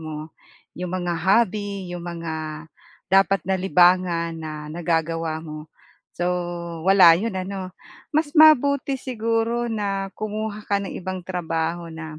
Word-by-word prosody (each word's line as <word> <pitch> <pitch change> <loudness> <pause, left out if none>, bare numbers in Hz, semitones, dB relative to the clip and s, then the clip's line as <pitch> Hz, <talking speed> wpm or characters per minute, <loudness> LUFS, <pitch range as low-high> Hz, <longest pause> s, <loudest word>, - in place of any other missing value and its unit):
mo. 155 0 -7 0.5
Iyong 180 +1 -4
mga 175 -2 -1
hobby, 200 -2 +1
'yong 175 - -6
mga 160 -2 -5 0.4
dapat 195 0 +4
na 190 - +2
libangan 180 -2 +3
na 155 -1 -7
nagagawa 165 -1 -1
mo. 155 -1 -8 0.5
So 175 - -2 0.6
wala 190 -4 +8
'yon 225 0 -3
ano? 185 0 -5 0.4
Mas 310 -1 +2
mabuti 280 -3 +5
siguro 230 -1 -1
na 195 -2 -2
kumuha 215 0 -4
ka 200 - +2
ng 195 - -6
ibang 185 0 -5
trabaho 170 -1 -2
na 160 -1 -8
185 Hz, 130 wpm, -23 LUFS, 165-205 Hz, 0.6 s, wala